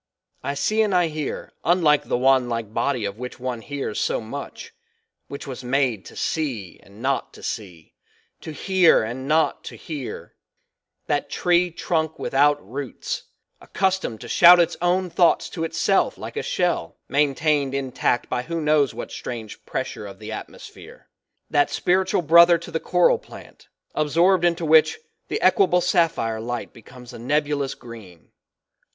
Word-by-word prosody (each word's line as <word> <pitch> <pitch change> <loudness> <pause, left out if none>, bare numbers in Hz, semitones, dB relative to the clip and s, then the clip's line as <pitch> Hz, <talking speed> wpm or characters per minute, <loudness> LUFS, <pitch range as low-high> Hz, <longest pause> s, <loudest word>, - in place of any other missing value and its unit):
I 140 - -3
see 215 +9 +1
and 210 -4 +1
I 175 -2 +3
hear, 150 -2 -5
unlike 165 -4 +3
the - - 0
wandlike 120 -4 +1
body 125 -5 0
of 100 +2 -5
which 125 0 -7
one 125 -2 -4
hears 140 +3 -4
so 480 +2 0
much, 465 0 -8 0.5
which 140 - -8
was 130 -1 -7
made 125 -5 0
to - - -12
see 125 - -3
and 100 +4 -15
not 135 0 -1
to - - -14
see; 90 -8 -7 0.5
to 160 - -8
hear 185 - +3
and 125 +4 -5
not 155 +1 +1
to - - -8
hear; 145 -6 -7 0.7
that - - -1
tree 180 0 +2
trunk 160 -2 -2
without 145 -6 +1
roots, 135 +2 -5 0.4
accustomed 190 - -1
to 120 - -8
shout 175 +7 +7
its 170 0 +2
own 180 +1 +1
thoughts 175 0 +3
to 165 - -5
itself 165 - +1
like - - -8
a - - -1
shell, - - -1
maintained 145 0 +1
intact 130 -2 -1
by 125 - -2
who 165 +6 -4
knows 150 -3 +2
what - - -6
strange 115 -4 -7
pressure - - -4
of - - -11
the - - -8
atmosphere; - - -11 0.4
that 145 -1 +2
spiritual 185 0 +1
brother 170 +2 +7
to 170 +1 -10
the 165 - -1
coral 180 +1 +3
plant, - - -14 0.3
absorbed 170 +4 +3
into 170 -1 +1
which, 155 0 +5 0.3
the - - -2
equable 385 - +4
sapphire 165 -10 +1
light 120 +1 -5
becomes 125 +2 -13
a - - -9
nebulous 145 +2 -1
green. 110 -8 -13
145 Hz, 155 wpm, -23 LUFS, 125-170 Hz, 0.7 s, shout